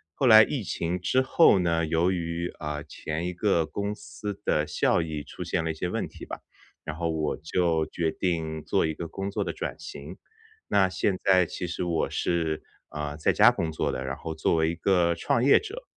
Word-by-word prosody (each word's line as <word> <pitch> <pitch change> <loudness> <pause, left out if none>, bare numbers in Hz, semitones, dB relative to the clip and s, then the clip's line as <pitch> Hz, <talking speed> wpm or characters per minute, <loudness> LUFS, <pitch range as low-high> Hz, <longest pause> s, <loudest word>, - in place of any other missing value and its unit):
后 135 - 0
来 110 -1 +10
疫 125 -1 -2
情 85 +1 -2
之 130 +9 +2
后 130 - +5
呢， 85 -2 +1
由 85 +3 +2
于 85 -1 -2
啊， 75 -1 -4
前 80 +3 -5
一 - - -2
个 90 -3 +1
公 100 0 -3
司 85 +5 -7
的 75 - +2
效 - - +2
益 75 -2 -5
出 - - -8
现 80 - -1
了 80 - -2
一 - - -4
些 80 +3 -3
问 - - -2
题 - - -11
吧， - - -7 0.4
然 80 - -5
后 85 -1 -1
我 80 -2 -1
就 80 0 0
决 80 -2 -1
定 80 -4 -2
做 - - +2
一 80 - -1
个 85 +2 -6
工 100 +3 -5
作 - - -1
的 - - -3
转 - - -5
型， 75 +6 -9 0.5
那 95 -2 +3
现 95 0 0
在 95 -2 +5
其 90 - -5
实 85 - -3
我 85 -2 0
是， 80 -3 -1 0.3
呃， 75 -1 -4
在 75 - +2
家 - - +7
工 80 -2 -2
作 80 - -1
的， 65 - -3
然 70 +1 -3
后 80 -1 -6
作 80 - +1
为 80 0 +2
一 85 - -3
个 85 -1 +2
创 100 +7 0
业 140 - +7
者。 450 +4 -8
85 Hz, 235 characters per minute, -27 LUFS, 80-95 Hz, 0.5 s, 来